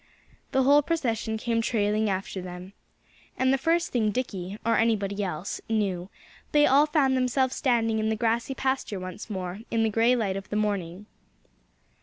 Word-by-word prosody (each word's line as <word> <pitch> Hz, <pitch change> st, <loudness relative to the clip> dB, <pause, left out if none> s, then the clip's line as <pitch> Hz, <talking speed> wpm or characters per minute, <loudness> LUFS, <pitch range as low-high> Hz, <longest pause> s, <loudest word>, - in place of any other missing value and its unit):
The 265 Hz, -, +3 dB
whole 285 Hz, +3 st, +6 dB
procession 235 Hz, -8 st, -1 dB
came 230 Hz, 0 st, 0 dB
trailing 215 Hz, -1 st, +1 dB
after 190 Hz, 0 st, -3 dB
them. 180 Hz, +1 st, -9 dB, 0.6 s
And 260 Hz, +1 st, +3 dB
the -, -, +3 dB
first 335 Hz, +4 st, +1 dB
thing 225 Hz, -4 st, +1 dB
Dickie 200 Hz, -4 st, -4 dB
or 230 Hz, -, +3 dB
anybody 205 Hz, -3 st, +1 dB
else 180 Hz, 0 st, -4 dB
knew, 195 Hz, -5 st, -1 dB, 0.4 s
they 295 Hz, 0 st, +6 dB
all 285 Hz, +3 st, +5 dB
found 285 Hz, -4 st, +2 dB
themselves 260 Hz, +1 st, +1 dB
standing 230 Hz, -5 st, +1 dB
in 215 Hz, 0 st, 0 dB
the 220 Hz, -, +1 dB
grassy 235 Hz, +4 st, 0 dB
pasture 265 Hz, -7 st, -1 dB
once 185 Hz, +4 st, -7 dB
more, 185 Hz, -1 st, -4 dB
in 225 Hz, -1 st, +1 dB
the 220 Hz, -, +1 dB
gray 230 Hz, +4 st, +3 dB
light 200 Hz, -5 st, -1 dB
of 195 Hz, 0 st, -8 dB
the -, -, -3 dB
morning. 200 Hz, -3 st, -2 dB
220 Hz, 170 wpm, -26 LUFS, 195-255 Hz, 0.6 s, whole